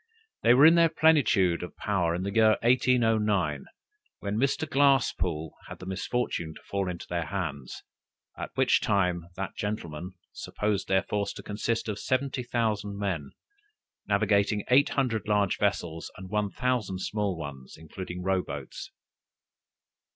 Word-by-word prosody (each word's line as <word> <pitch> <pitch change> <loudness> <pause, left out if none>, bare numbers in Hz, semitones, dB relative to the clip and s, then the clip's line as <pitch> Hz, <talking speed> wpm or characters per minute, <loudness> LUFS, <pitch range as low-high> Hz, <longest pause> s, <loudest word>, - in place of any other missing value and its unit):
They 120 - +6
were 140 +4 +7
in 165 - +9
their 170 -1 +5
plenitude 140 - +3
of 90 - -8
power 90 -5 0
in 90 - -3
the 100 +1 -3
year 110 -1 +5
1809, 110 - +2 0.5
when 100 0 -4
Mr. 135 +6 0
Glasspoole 135 - +2 0.2
had - - -8
the - - -10
misfortune 95 -4 -2
to - - -13
fall 100 -2 -2
into 85 -2 -6
their 85 -1 -2
hands, 75 -10 -5 0.5
at - - -6
which - - +3
time 90 -4 +1
that 95 +1 -5
gentleman 90 -4 -4 0.2
supposed 105 -2 -2
their 95 0 +2
force 100 -1 -2
to - - -10
consist 115 +2 -2
of 105 -1 -3
70,000 120 -6 -1
men, 90 -9 -2 0.8
navigating 105 0 +2
eight 140 +3 +5
hundred 120 -6 -1
large 105 -2 +1
vessels, 85 -5 -1
and 95 0 -10
one 105 -1 0
thousand 125 -6 -1
small 100 -3 -1
ones, 70 -4 -8
including 90 +3 -7
row 95 0 +1
boats. 70 -4 -7
100 Hz, 145 wpm, -28 LUFS, 90-115 Hz, 0.8 s, in